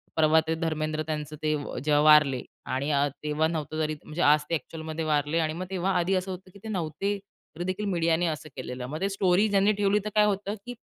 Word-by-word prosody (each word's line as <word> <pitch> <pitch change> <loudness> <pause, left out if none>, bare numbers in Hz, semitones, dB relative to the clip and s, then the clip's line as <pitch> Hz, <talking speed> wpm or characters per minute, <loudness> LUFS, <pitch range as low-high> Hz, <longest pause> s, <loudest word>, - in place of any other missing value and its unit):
परवा 160 0 +5
ते 160 - +1
धर्मेंद्र 155 -1 -2
त्यांचं 155 -1 -4
ते 155 0 +2
अ, 145 - -5
जेव्हा 150 -1 +3
वारले 150 -4 +6 0.3
आणि 140 +3 -1
अ, 140 0 +3 0.2
तेव्हा 150 +1 +1
नव्हतं 155 -1 -3
तरी 155 0 -1
म्हणजे 155 +3 -5
आज 150 -1 +5
ते - - -2
अ‍ॅक्चुअलमध्ये 160 0 -5
वारले 150 +1 +1
आणि 155 -1 0
मग 180 +3 -5
तेव्हा 190 0 0
आधी 180 +2 +1
असं 185 +1 -2
होतं, 185 +1 -8
की 200 - -14
ते - - -7
नव्हते. 190 +2 -2 0.4
तरीदेखील 185 +4 -2
मीडियाने 170 0 +2
असं 155 -1 -4
केलेलं. 125 -1 -5
मग 155 +6 -5
ते 195 - +1
स्टोरी 195 +1 +3
ज्यांनी 200 +1 +4
ठेवली, 205 0 +2
तर - - -1
काय 210 0 +6
होतं, 205 0 -1
की 245 - -5
160 Hz, 220 wpm, -27 LUFS, 155-190 Hz, 0.4 s, वारले